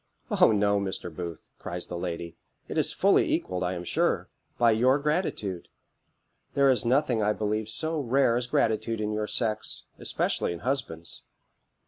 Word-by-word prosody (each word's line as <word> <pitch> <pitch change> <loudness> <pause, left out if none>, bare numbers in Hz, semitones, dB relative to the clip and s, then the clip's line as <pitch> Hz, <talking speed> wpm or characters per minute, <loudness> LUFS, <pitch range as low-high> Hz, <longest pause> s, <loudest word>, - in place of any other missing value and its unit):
"O - - +5
no, 100 -1 +3
Mr. 95 -4 -4
Booth," 85 -2 -6
cries 90 0 -5
the - - -6
lady; 85 -1 -4 0.3
"it - - -5
is - - +2
fully - - +3
equalled, 90 -1 -1
I 90 +1 0
am 85 - -5
sure, - - 0 0.3
by 120 -1 +5
your 125 +5 +4
gratitude. 145 - -1 0.9
There 140 -1 +5
is 120 -5 +1
nothing, 125 -1 +2
I 105 0 +2
believe, 105 0 -2
so 160 +8 -2
rare 130 -2 +3
as 120 0 -1
gratitude 110 -1 +1
in 105 0 -1
your 105 0 -1
sex, 110 -2 0 0.2
especially - - 0
in 85 - -8
husbands. 85 -11 -3
110 Hz, 160 wpm, -27 LUFS, 90-125 Hz, 0.9 s, O